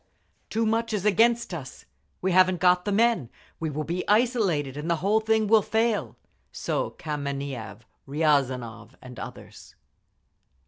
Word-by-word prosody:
"Too 225 +1 0
much 225 +1 0
is 205 -2 -2
against 230 +1 +3
us. 140 -7 -8 0.4
We 190 - +1
haven't 185 0 +4
got 180 +1 +3
the 205 - -1
men. 220 - +2 0.3
We 160 - -2
will 150 +1 -3
be 175 +4 -3
isolated, 205 - +2
and 150 +3 -5
the 170 - +3
whole 200 +6 +2
thing 220 0 +1
will 220 +1 +5
fall." 220 +1 0 0.4
So - - -2
Kameniev, 140 -7 -5 0.3
Riazanov 135 -6 0
and 125 -2 -11
others. - - -10
180 Hz, 140 wpm, -26 LUFS, 145-220 Hz, 0.4 s, will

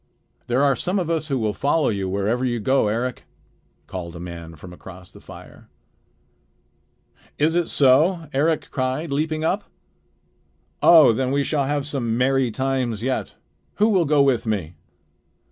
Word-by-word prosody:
"There 125 +3 +1
are 140 -2 +3
some 180 - -2
of 175 -3 -1
us 160 -2 -1
who 135 -3 -1
will 110 -3 -1
follow 145 +7 +1
you 100 -3 -2
wherever 100 +6 -1
you 120 -2 -1
go, 130 +1 +2
Eric," 120 +4 -3 0.6
called 85 -2 -7
a - - -8
man 85 -2 -8
from 90 +4 -12
across 90 0 -13
the - - -15
fire. - - -14 1.7
"Is 155 +2 +2
it 175 -1 0
so?" 155 +6 +3
Eric 155 +4 0
cried, 130 +4 -2
leaping 155 +2 -1
up. 195 +6 -1 1.2
"Oh! 155 -8 +7
then 130 +2 -1
we 140 +1 +1
shall 140 -1 -1
have 145 0 -1
some 120 -6 -2
merry 135 0 +2
times 125 -2 -2
yet. 130 0 -2 0.4
Who 215 +2 +3
will 185 -6 +2
go 145 -1 +3
with 130 -4 +1
me?" 95 -7 -2
130 Hz, 160 wpm, -22 LUFS, 110-150 Hz, 1.7 s, Oh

